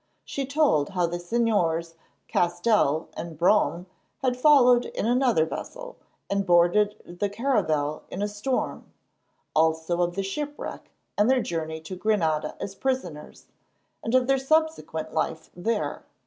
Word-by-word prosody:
She 275 -2 -4
told 275 - +2
how 180 -3 0
the 175 +1 -3
Señors 175 -5 0 0.3
Castell 175 -3 +1
and 165 -2 -7
Brome 175 0 +2 0.4
had 255 -1 +2
followed 250 -3 +5
in - - -4
another 240 -8 +3
vessel, - - -7 0.3
and 200 0 0
boarded 175 +1 +2
the 205 - +1
caravel 185 - 0
in 195 - -4
a - - +1
storm; 210 +6 -3 0.6
also 160 +2 +2
of 175 0 0
the 195 - -1
shipwreck 290 +9 -5 0.3
and 210 +3 +4
their 260 -2 +3
journey 160 -1 -3
to 160 +4 -7
Granada 165 -7 0
as 195 - -5
prisoners, 195 - -4 0.6
and 225 +3 0
of 255 -1 +4
their 270 +1 +2
subsequent 315 - 0
life 160 0 -2
there. 210 +5 -2
195 Hz, 135 wpm, -26 LUFS, 165-250 Hz, 0.6 s, followed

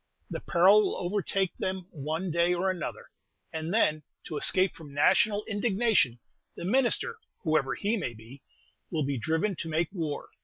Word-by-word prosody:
This - - -4
peril 190 +5 +6
will - - 0
overtake 190 0 -1
them 185 -1 -2
one 160 +5 -3
day 170 +2 +2
or 190 +2 +1
another, 180 -4 -6 0.4
and 160 +1 -3
then, 155 -8 +2 0.2
to 155 - -6
escape 185 +5 +2
from 145 -4 -12
national 205 +7 +3
indignation, 205 - +2 0.4
the - - -6
minister, 270 - +1 0.2
whoever 155 -5 +1
he 215 +3 0
may 125 - -3
be, 115 +5 -13 0.5
will 160 -3 -1
be 140 -2 -1
driven 160 - 0
to 165 - -4
make 160 +1 0
war. 160 -6 -4
175 Hz, 160 wpm, -29 LUFS, 155-200 Hz, 0.5 s, peril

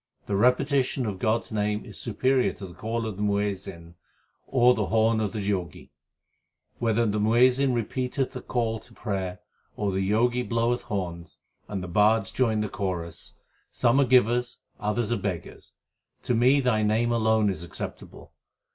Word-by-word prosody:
The 100 - -2
repetition 130 +3 +2
of 100 -4 -4
God 110 +3 +1
s - - -13
name 105 0 -1
is - - -11
superior 130 +3 +1
to 100 - -9
the 90 - -10
call 115 +3 -3
of 110 -4 -5
the - - -5
Muazzin 100 -4 -2
l - - -18 0.5
or 125 -1 +5
the 105 -5 -1
horn 110 0 +2
of 105 -2 -1
the 110 - -4
Jogi, 90 -6 -3 0.9
Whether 115 0 +2
the 105 -1 0
Muazzin 125 +5 +4
repeateth 125 +3 -2
the - - -7
call 115 -3 -1
to - - -16
prayer 95 -4 -4 0.4
or 100 -2 0
the 95 - -1
Jogi 120 +4 +2
bloweth 120 0 0
horns, 90 -7 -5 0.3
and 95 -3 -4
the - - -5
bards 105 +3 +3
join 110 -4 +1
the 105 - -1
chorus, 95 -7 -5 0.3
Some 120 +2 +2
are - - +4
givers, 125 0 +3 0.2
others 105 +2 -1
are 120 - +1
beggars; 95 -5 -5 0.5
to - - 0
me 125 +5 +4
Thy 125 -4 +2
name 110 +3 +1
alone 110 -2 +2
is 85 -3 -6
acceptable. 85 - -8
110 Hz, 170 wpm, -26 LUFS, 100-120 Hz, 0.9 s, or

